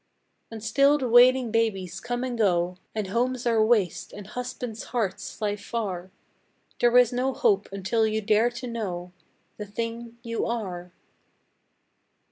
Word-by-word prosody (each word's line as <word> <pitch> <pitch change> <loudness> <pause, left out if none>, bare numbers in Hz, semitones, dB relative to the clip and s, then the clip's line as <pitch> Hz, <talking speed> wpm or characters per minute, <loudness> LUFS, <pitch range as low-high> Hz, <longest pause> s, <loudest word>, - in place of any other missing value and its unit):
And 225 -2 -8
still 275 +6 +4
the 260 -3 -2
wailing 245 0 +6
babies 195 -6 0
come 245 +3 -3
and 255 -2 -2
go, 180 -5 +1 0.2
And 215 -2 -1
homes 245 +4 0
are 230 -2 +3
waste, 190 -7 +1
and 205 - -9
husbands' 245 0 -6
hearts 225 -6 -2
fly 205 -1 -1
far; 195 -4 -4 0.7
There 240 0 +4
is 250 0 +5
no 255 +2 0
hope 425 -5 +2
until 200 +3 +1
you 215 0 0
dare 220 +2 +3
to 240 +1 -7
know 190 -7 -4 0.5
The 210 - -6
thing 230 +2 -5
you 230 -1 -2
are! 185 -7 -4
225 Hz, 145 wpm, -26 LUFS, 200-245 Hz, 0.7 s, wailing